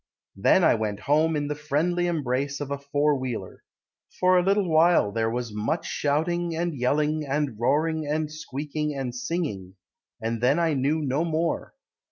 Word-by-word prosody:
Then 100 - +4
I - - +6
went 105 -2 -2
home 155 +3 +2
In 145 -1 -1
the 150 - -1
friendly 155 +4 0
embrace 140 -3 -1
Of 145 -1 -5
a 140 - -2
four 145 +1 +1
wheeler. 120 -8 -5 0.6
For 185 0 +4
a 180 - +5
little 195 +1 +2
while, 160 -9 +4
There 115 +1 0
was 120 -1 -3
much 110 +11 -2
shouting 165 +4 -1
and 170 -1 -1
yelling 150 +4 +1
and 140 -5 -2
roaring 155 +5 +1
and 155 +1 -1
squeaking 150 -1 -4
and 130 -3 -3
singing; 125 - -4 0.4
And 115 0 -3
then 130 +5 +3
I 165 -2 +2
knew 145 +3 0
No 140 +3 0
more. 165 0 -2
150 Hz, 170 wpm, -25 LUFS, 130-160 Hz, 0.6 s, I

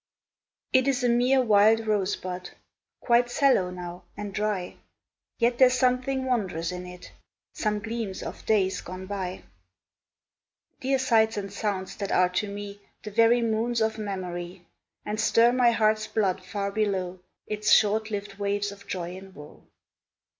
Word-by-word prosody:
It 260 +1 +4
is 270 -1 +1
a 245 - +3
mere 250 +2 +3
wild 220 0 +4
rosebud, 185 -3 -2 0.5
Quite 240 0 +3
sallow 245 -8 +3
now, 180 0 -8
and 205 -1 -6
dry, 210 -3 -2 0.6
Yet 240 0 +1
there 260 -1 +8
's 250 - 0
something 255 +1 +1
wondrous 190 -9 -1
in 180 0 -6
it, 180 0 -11 0.4
Some 210 -1 -1
gleams 225 -2 -4
of - - -7
days 195 -3 +2
gone 185 +1 -8
by, 185 -2 -5 1.4
Dear 270 +1 +1
sights 225 -4 +2
and 200 -1 -5
sounds 200 -3 -3
that 200 -1 -4
are 180 0 +4
to 185 +3 -1
me 205 0 -7 0.2
The 210 - -7
very 230 +3 +4
moons 230 +1 0
of 220 0 0
memory, 180 -3 -5 0.4
And 210 +1 -3
stir 230 +1 +4
my 250 -1 +4
heart's 215 -2 +2
blood 195 -4 0
far 200 +1 -3
below 190 -4 -1 0.3
Its 210 0 -2
short 220 +1 +4
lived 205 -1 -5
waves 205 0 -1
of 200 0 -14
joy 180 -1 -4
and 190 0 -12
woe. 150 0 -13
210 Hz, 155 wpm, -26 LUFS, 190-230 Hz, 1.4 s, there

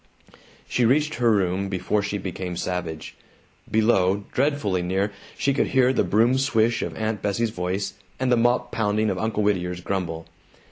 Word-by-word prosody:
She 125 - +1
reached 150 +6 +3
her 120 - +4
room 95 -1 +1
before 100 +2 0
she 100 +1 -2
became 90 -2 -5
savage. 85 -3 -4 0.6
Below, 100 -3 +2
dreadfully 135 -9 +1
near, 95 +3 0 0.3
she 140 - +1
could 135 - +1
hear 130 -1 +3
the - - +2
broom 115 +8 +3
swish 120 -3 +2
of - - -4
Aunt 110 -1 -2
Bessie's 110 +3 0
voice, 95 0 -2 0.3
and 130 -1 +1
the - - +6
mop 120 +1 +1
pounding 110 -1 +1
of - - -3
Uncle 110 -1 -1
Whittier's 90 -3 0
grumble. 85 -4 -3
105 Hz, 160 wpm, -24 LUFS, 95-120 Hz, 0.6 s, the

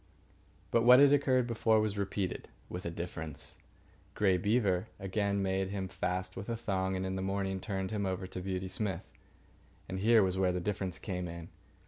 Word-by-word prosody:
But 115 - +4
what 125 +1 +9
had 140 0 +7
occurred 130 -3 +3
before 115 -2 +2
was 105 -1 0
repeated—with 95 -2 -4
a - - -1
difference. 80 -3 -6 0.6
Grey 95 -3 +3
Beaver 100 0 +1
again 100 +1 0
made 95 0 0
him 95 -1 -3
fast 90 0 -3
with 100 +4 -6
a 115 - -1
thong, 95 -3 -1
and 95 0 -2
in 95 0 -2
the 95 - -2
morning 95 0 -1
turned 95 -1 -3
him 100 -2 -1
over 95 0 -2
to 90 0 -6
Beauty 95 0 -3
Smith. 95 -2 -2 0.8
And 95 - -4
here 110 +1 +5
was 95 0 0
where 95 -1 +3
the 90 - -1
difference 95 -1 -2
came 90 -2 -4
in. 85 -1 -8
95 Hz, 180 wpm, -32 LUFS, 95-105 Hz, 0.8 s, what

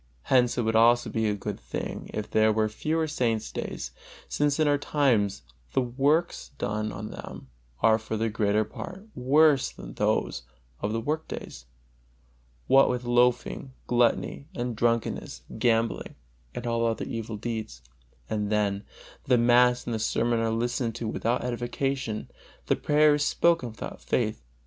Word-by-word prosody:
Hence 125 -2 +4
it 120 - +1
would 110 0 0
also 120 +2 +5
be 110 -1 0
a 105 - +1
good 100 - -5
thing - - -5
if 105 - -5
there 110 0 +4
were 110 0 +2
fewer 155 +9 -1
saint's 115 -7 -1
days, 65 -1 -5 0.4
since 145 0 0
in 155 - +4
our 145 -1 +3
times 120 - +1 0.3
the - - +3
works 140 +7 0
done 105 +1 -2
on 105 +1 -6
them 65 - -9 0.3
are 110 0 +5
for 110 0 -4
the 115 +1 0
greater 105 -1 +1
part 185 - -8
worse 140 +2 +4
than - - -10
those - - 0 0.4
of 105 - -2
the 115 - -1
work 155 +7 -2
days, 60 - -8 1.0
what 135 0 +6
with 125 0 -1
loafing, 125 +2 +1
gluttony, 120 +3 +1
and 120 -1 -2
drunkenness, 115 - -1 0.2
gambling 115 -1 +1 0.4
and 120 - -5
other 115 -1 0
evil 115 -1 -5
deeds; 110 - -5 0.4
and 105 -1 -2
then, 100 -1 +1 0.4
the 125 -1 +4
mass 125 +1 +4
and 120 - -3
the 110 - -1
sermon 115 +2 +1
are 115 0 +1
listened 115 +1 -1
to 115 - -4
without 115 +3 -1
edification, 125 -1 -2 0.4
the - - +2
prayer 150 0 +4
is 145 0 +1
spoken 165 -4 +2
without 110 -2 -8
faith. 110 - -1
120 Hz, 155 wpm, -27 LUFS, 110-130 Hz, 1.0 s, what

